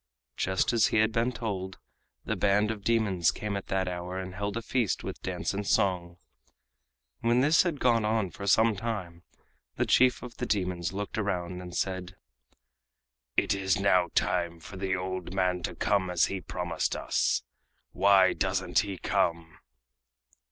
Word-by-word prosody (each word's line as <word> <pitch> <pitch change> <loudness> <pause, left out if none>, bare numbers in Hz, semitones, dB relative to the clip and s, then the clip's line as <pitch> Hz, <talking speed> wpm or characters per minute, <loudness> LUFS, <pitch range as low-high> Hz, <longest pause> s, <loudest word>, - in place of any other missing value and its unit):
Just 95 +5 0
as 115 -3 +4
he - - 0
had 110 +1 +3
been 115 +2 +1
told, 100 -6 -4 0.5
the - - -1
band 105 +2 +2
of 105 -3 -7
demons 105 -7 +2
came 105 -1 -3
at 100 - -5
that 95 -1 0
hour 90 +1 -4
and 95 -1 -5
held 100 +3 -3
a - - -2
feast 120 -3 0
with - - -6
dance - - -3
and 100 0 -3
song. 90 -3 +1 1.0
When 120 +2 +2
this 150 +4 +5
had 170 -6 -1
gone 115 -3 +3
on 105 -3 0
for 100 - -7
some 110 +2 +4
time 95 -6 -4 0.5
the - - 0
chief 125 -1 +4
of 125 -1 -9
the - - -3
demons 90 -4 -1
looked 100 +2 -4
around 90 -3 -2
and 90 -1 -7
said: 95 0 -3 1.2
"It - - +3
is 100 0 0
now 95 -3 +3
time 85 -2 0
for 95 - -11
the 95 0 -1
old 95 0 -4
man 90 -1 +1
to - - -4
come 100 -3 +1
as 90 -1 +3
he 95 -1 -4
promised - - -2
us. - - 0 0.5
Why 95 -1 +5
doesn't 95 -2 0
he 100 -3 -2
come?" 85 -2 -1
95 Hz, 165 wpm, -28 LUFS, 90-110 Hz, 1.2 s, this